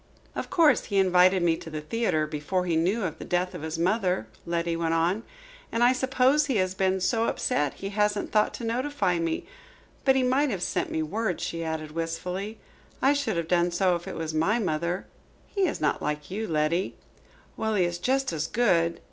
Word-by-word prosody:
"Of - - -4
course, 325 -4 +4
he 200 - -2
invited 185 -1 +5
me 165 -1 +3
to - - -9
the 155 -1 -4
theatre 155 -1 0
before 155 +4 -2
he 170 -2 0
knew 190 +8 +1
of 175 -5 -3
the - - -6
death 180 +1 -1
of - - -7
his 160 +1 -4
mother," 180 - +1 0.2
Letty 170 0 0
went 165 0 0
on. 175 +6 +1 0.5
"And 230 - +1
I 245 +1 +6
suppose 260 +3 +2
he 265 - 0
has 185 -2 +1
been 190 0 +1
so 225 +4 +1
upset 145 - 0
he 195 - -5
hasn't 210 0 0
thought 210 -1 +3
to - - -7
notify 235 -6 0
me. 165 -1 -2 0.6
But 265 -1 +4
he 265 - +3
might 265 +3 +2
have 190 -6 -2
sent - - -1
me 160 - -1
word," 200 +3 -2
she 165 0 -3
added 160 -1 -4
wistfully. 180 +6 -4 0.4
"I 275 - +4
should 280 -10 -1
have 165 -1 -2
done 175 0 +3
so 180 +1 +2
if 170 - -6
it - - -5
was 160 -1 -4
my 165 +9 +2
mother." 175 -3 -1 0.4
"He 395 -3 0
is - - -3
not 150 - 0
like 150 +2 -3
you, 215 +3 -3
Letty." 160 +3 0 0.6
"Well, 220 -1 -1
he 190 - +3
is 175 0 -2
just 265 -3 0
as 155 -1 -1
good." 170 -8 +2
180 Hz, 205 wpm, -27 LUFS, 165-225 Hz, 0.6 s, I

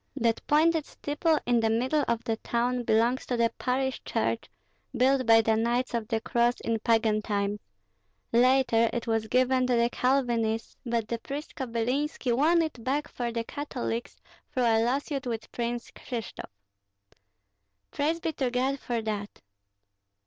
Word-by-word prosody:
That 230 -4 +1
pointed 315 +1 +3
steeple 305 +2 0
in 240 -1 +3
the 225 -1 +2
middle 255 +7 +1
of 235 -1 0
the 225 -1 -1
town 245 +2 -1
belongs 235 +4 +2
to 245 - -1
the 230 0 +2
parish 265 +1 -1
church - - -1 0.5
built 260 0 +3
by 225 0 +7
the 220 0 +2
Knights 240 +3 0
of 230 -2 -2
the 225 -2 0
Cross 240 +1 +1
in 230 -1 -1
pagan 220 -1 +2
times; 205 -1 -1 0.7
later 240 -2 +4
it 240 - -2
was 225 -1 0
given 255 +2 +2
to 250 - +2
the 235 +1 +2
Calvinists, 240 -4 0
but 230 -2 0
the 235 0 -3
priest 285 +5 -6
Kobylinski 250 +1 -1
won 330 +6 +4
it 290 -7 -5
back 290 +4 -1
for 240 -1 -3
the 230 0 -2
Catholics 245 -3 -4 0.3
through 255 - 0
a 225 -1 +3
lawsuit 275 +2 -1
with 225 -2 -4
Prince 240 0 -3
Krishtof." 235 -5 -7 1.4
"Praise 315 +4 0
be 325 -1 -2
to 265 -3 -1
God 260 +3 0
for 235 -3 -3
that!" 210 -2 -4
240 Hz, 155 wpm, -28 LUFS, 230-265 Hz, 1.4 s, by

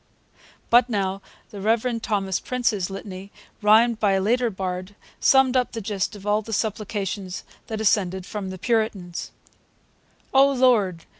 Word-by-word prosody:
But 240 +1 +6
now 195 -3 -1 0.3
the 200 - -8
Reverend 230 +2 +1
Thomas 195 -4 -1
Prince's 230 -7 -1
litany, 195 0 -8 0.3
rhymed 220 +2 +5
by 205 -3 +3
a 195 - +2
later 240 +5 +1
bard, 185 0 -5 0.2
summed 265 -1 +4
up 250 -1 +1
the 230 - -3
gist 205 -1 -2
of 200 -1 -11
all 210 +1 +2
the 225 +1 -7
supplications 205 -3 -3 0.2
that 220 -2 -4
ascended 190 -4 +1
from 200 -2 -5
the 185 - -6
Puritans: 210 -5 -1 1.0
O 270 +1 +6
Lord! 220 -10 +2
210 Hz, 145 wpm, -24 LUFS, 190-230 Hz, 1.0 s, But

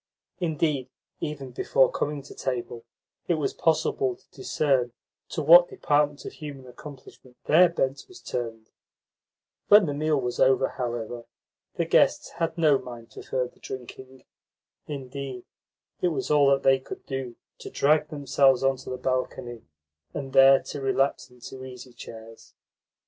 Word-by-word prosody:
Indeed, 155 -6 -1 0.3
even 140 -4 -5
before 130 +1 +2
coming 145 -1 -3
to - - -12
table, 120 -2 -4 0.4
it 175 - +2
was 155 - -2
possible 135 -5 +1
to - - -29
discern 130 -3 0 0.4
to 155 - -3
what 175 +4 +8
department 145 -1 0
of - - -7
human 145 -4 -9
accomplishment 130 -1 -13
their 175 +4 +6
bent 135 -5 -2
was 370 - -14
turned. 115 -3 -5 1.0
When 205 -1 +7
the 145 - -2
meal 150 0 +1
was 125 -2 -3
over, 135 0 +4
however, 120 -1 -5 0.5
the - - 0
guests - - +3
had 165 0 -1
no 150 -5 +4
mind 120 -2 -11
for - - -9
further 125 -1 -3
drinking. 130 0 -9 0.6
Indeed, 135 -3 -6 0.6
it - - +3
was 135 -6 -2
all 145 -2 +5
that 135 0 +2
they 135 0 +5
could 130 - -10
do 135 -3 -5 0.2
to - - -8
drag 150 +1 +2
themselves 135 -3 +2
on 135 0 +2
to - - -10
the 130 - -4
balcony, 125 -2 -3 0.5
and 135 -2 -5
there 135 0 +7
to 145 - -6
relapse 135 0 0
into 125 +1 -11
easy 125 -1 -10
chairs. 115 -1 -12
135 Hz, 150 wpm, -26 LUFS, 125-150 Hz, 1.0 s, what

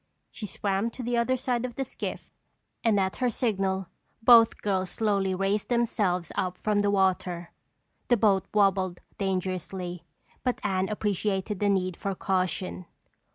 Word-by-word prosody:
She 210 - -6
swam 200 +3 -1
to 255 - -4
the 240 +1 0
other 235 +2 +2
side 245 -1 -1
of 250 -2 -4
the 270 - -2
skiff - - -6 0.5
and 220 -3 +3
at 190 -1 0
her 250 - +1
signal 195 -5 0 0.4
both 230 -1 +7
girls 190 -2 0
slowly 195 -3 0
raised 195 +2 0
themselves 205 -8 +1
up 185 -1 -2
from 210 -1 +1
the 205 0 +2
water. 185 -3 +1 0.6
The 240 - +4
boat 200 -3 +3
wobbled 195 -3 +2 0.2
dangerously 185 -2 -3 0.4
but 250 -1 0
Anne 190 -2 0
appreciated 205 -1 -1
the 205 - +2
need 185 -2 +1
for 195 +1 -3
caution. 185 -1 -1
195 Hz, 150 wpm, -27 LUFS, 185-220 Hz, 0.6 s, both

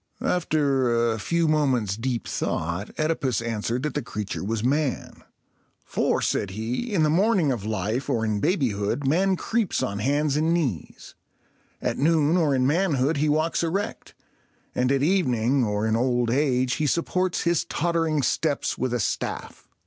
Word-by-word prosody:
After 135 -8 +1
a 110 - -5
few 170 +8 0
moments' 130 -10 +1
deep 120 +1 -3
thought, 85 +6 -2
OEdipus 155 -7 0
answered 115 +2 -2
that 150 - -2
the 145 - -1
creature 105 -6 -5
was 110 +2 -2
man. 140 +1 -1 0.6
"For," - - 0
said 100 - 0
he, 115 - -3
"in 180 -6 +2
the 155 - +3
morning 185 -3 +3
of 115 -6 -3
life, 110 +5 -2
or 115 -1 0
in 105 -1 0
babyhood, 130 - 0
man 185 +7 +2
creeps 215 - -1
on 100 -6 -2
hands 145 +4 +1
and 160 +3 +2
knees; 130 - -3 0.7
at - - -1
noon, 155 +1 +3
or 155 -6 +2
in 130 -1 +2
manhood, 150 -2 +1
he 150 +2 +1
walks 155 +2 +1
erect; 185 +5 -3 0.6
and 125 +1 +1
at 140 0 +2
evening, 135 - +2
or 105 -1 -1
in 110 0 +1
old 120 0 +1
age, 130 -2 +1
he 150 - 0
supports 180 +4 0
his 170 -2 +1
tottering 165 -3 0
steps 145 +4 0
with 125 -1 0
a - - -1
staff." - - -4
135 Hz, 160 wpm, -25 LUFS, 115-160 Hz, 0.7 s, the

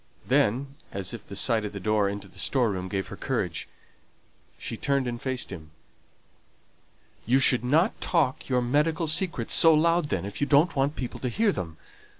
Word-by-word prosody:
Then, 135 +6 +1
as 95 +1 -4
if 115 -3 -9
the 100 - -8
sight 110 +1 +2
of 105 - -5
the 100 - -5
door 105 +1 +1
into 100 0 -6
the 95 - -12
store 125 -5 +1
room 95 -1 -4
gave 95 -2 -3
her - - -7
courage, - - -3 0.9
she - - -5
turned 140 +3 0
and 120 -1 -4
faced 130 -5 -3
him. 80 -4 -9 1.6
"You 125 +3 +4
should 130 -2 +4
not 160 - +2
talk 150 -8 0
your 125 -1 +2
medical 150 +6 +1
secrets 155 - 0
so 165 -1 +6
loud 170 +2 +3
then, 95 -10 -2
if 100 - -7
you 145 - +2
don't 155 +4 +4
want 140 +2 +1
people 125 -3 -5
to 125 - -2
hear 210 - +2
them. 80 - -5
125 Hz, 185 wpm, -26 LUFS, 105-150 Hz, 1.6 s, so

